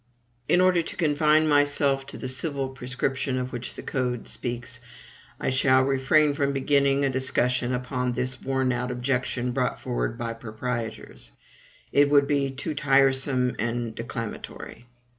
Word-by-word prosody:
In 180 - +4
order 185 -2 +4
to 165 - -7
confine 155 0 +3
myself 145 -2 +3
to - - -8
the 130 - -5
civil 135 +1 -1
prescription 130 0 -2
of 125 0 -4
which 120 +1 -5
the - - -8
Code 125 -3 -2
speaks, 120 0 -4 0.6
I - - -1
shall 130 0 +4
refrain 140 +3 +3
from 140 -1 0
beginning 140 0 +2
a - - +2
discussion 125 -1 +1
upon 125 0 -2
this 130 +1 -1
worn 130 -1 0
out 125 0 -2
objection 125 0 -1
brought 125 +1 -1
forward 120 -3 -3
by 115 -1 -3
proprietors; 115 - -6 0.6
it 145 0 +4
would 140 -1 +5
be 140 -2 +1
too 140 +4 -4
tiresome 135 -2 +2
and 115 +1 -2
declamatory. 115 +1 -7
130 Hz, 145 wpm, -25 LUFS, 125-140 Hz, 0.6 s, would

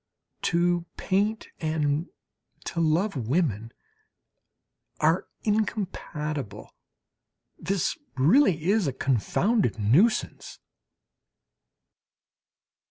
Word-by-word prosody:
To 175 0 +1
paint 205 +3 0
and 155 0 -1 0.6
to 170 - -3
love 165 +5 +1
women 120 - -1 1.3
are 160 +4 +2 0.2
incompatible. 155 - -3 0.9
This 185 +1 0
is - - -9 0.2
really 170 - +4
a 195 -11 +1
confounded 140 - +1
nuisance! 140 - +1
165 Hz, 65 wpm, -26 LUFS, 145-195 Hz, 1.3 s, really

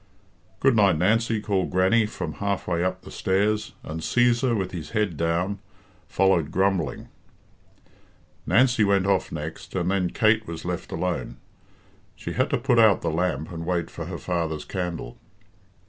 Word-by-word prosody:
"Good 135 -2 +4
night, 100 -6 +4
Nancy," 110 +5 +2
called 100 -3 -1
Grannie, 95 +5 +3
from - - -5
half 100 -1 -1
way 85 -1 0
up 90 0 -2
the - - -11
stairs, 105 +3 0
and 80 +1 -5
Cæsar, 120 +5 +2
with 95 -2 -2
his 80 -4 -6
head 105 -6 0
down, 85 +5 -1 0.5
followed 90 -5 +2
grumbling. 95 -2 0 1.4
Nancy 120 -1 +4
went 100 -2 +3
off 100 -1 +1
next, 80 +3 -7
and 90 0 0
then 95 -2 +1
Kate 110 +2 +2
was 85 0 -7
left 90 -1 -4
alone. 85 -7 -3 0.8
She - - -6
had - - +1
to - - +1
put 120 - +2
out 110 -3 +5
the 85 - 0
lamp 80 -3 -1
and 85 -1 -5
wait 85 -1 -2
for - - -6
her - - -5
father's 85 -4 -2
candle. 90 -9 -5
95 Hz, 160 wpm, -25 LUFS, 85-105 Hz, 1.4 s, out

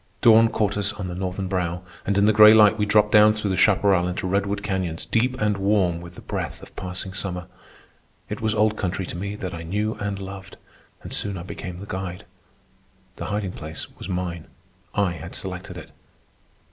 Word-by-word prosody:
Dawn 115 0 +7
caught 105 -2 0
us 100 +1 0
on 100 -2 -6
the 90 - -4
northern 95 +1 -3
brow, 90 -1 -2 0.2
and 100 0 +1
in 100 - +4
the 110 - +5
gray 110 +1 +9
light 105 -1 +7
we 105 -1 0
dropped 105 0 +4
down 105 0 +7
through 105 -3 -1
chaparral 95 -2 +3
into 90 +1 -3
redwood 100 +2 0
canyons 95 -4 -2
deep 125 +3 0
and 105 -1 +1
warm 95 -4 +1
with 85 0 -10
the - - -10
breath - - -4
of - - -14
passing 95 +1 -4
summer. 90 -2 -4 0.8
It - - -5
was 110 -1 0
old 110 0 +3
country 95 -2 -2
to - - -7
me 100 +3 -4
that 95 -3 -5
I 85 - -6
knew 105 +6 -1
and 105 -1 -2
loved, 95 0 -9 0.5
and - - -6
soon 100 -2 -1
I 85 - -6
became 90 -1 -7
the 100 - -7
guide. 95 -2 -5 0.9
The - - -5
hiding 105 -2 -2
place 80 -3 -7
was - - -8
mine. 90 -3 -3 0.5
I 100 -3 +2
had 85 0 -7
selected 95 -1 -6
it. - - -10
95 Hz, 195 wpm, -24 LUFS, 90-105 Hz, 0.9 s, gray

